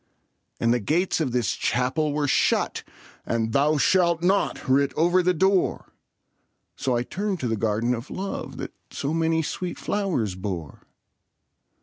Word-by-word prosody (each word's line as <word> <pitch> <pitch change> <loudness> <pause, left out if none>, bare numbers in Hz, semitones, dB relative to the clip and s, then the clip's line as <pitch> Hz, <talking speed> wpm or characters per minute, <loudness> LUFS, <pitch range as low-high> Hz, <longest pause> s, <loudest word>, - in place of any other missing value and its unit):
And 115 0 +3
the 120 - +1
gates 170 - +1
of 140 -5 0
this 120 -6 +1
Chapel 130 +5 0
were 145 0 0
shut, - - +2 0.4
And 115 -1 -1
'Thou 150 +2 +3
shalt 170 +1 +3
not' 195 +2 +1
writ 135 +1 +3
over 175 +3 +3
the 180 +1 +3
door; 190 +2 +1 0.8
So 130 -2 -1
I 120 - 0
turned 195 +6 -3
to 125 - -1
the 115 - 0
Garden 110 +3 0
of 120 +3 -5
Love 195 +1 -5
That - - -6 0.2
so 140 +3 -3
many 165 0 +1
sweet 175 +2 -4
flowers 175 - -1
bore. 90 -6 -6
145 Hz, 150 wpm, -25 LUFS, 120-175 Hz, 0.8 s, And